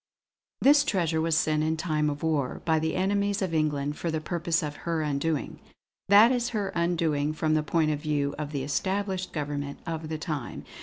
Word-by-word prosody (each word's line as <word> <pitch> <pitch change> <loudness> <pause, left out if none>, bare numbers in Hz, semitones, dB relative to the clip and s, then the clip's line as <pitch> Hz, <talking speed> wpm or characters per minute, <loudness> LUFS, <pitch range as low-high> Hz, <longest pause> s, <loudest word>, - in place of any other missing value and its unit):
"This 290 +2 +6
treasure 170 - 0
was 165 -1 +2
sent, 155 -1 +2
in 160 +1 0
time 155 -2 0
of 145 +1 -5
war, 150 -5 -1
by 160 -1 +3
the 160 0 -1
enemies 200 +2 +1
of 180 -3 -2
England, 150 -2 0
for 170 - -2
the 160 -1 -1
purpose 170 +1 -1
of 150 -1 -4
her 165 -2 -2
undoing 150 +1 -2 0.5
that 210 +4 +8
is 245 -1 0
her 200 -2 -1
undoing 165 -4 0
from 155 0 0
the 155 - +3
point 155 +1 +1
of 150 - -2
view 145 -2 -1
of 150 -1 -4
the 140 -3 -2
established 190 +5 -1
government 145 -2 -4
of 160 -2 -4
the 160 - -2
time. 155 -6 -5
160 Hz, 195 wpm, -27 LUFS, 150-175 Hz, 0.5 s, that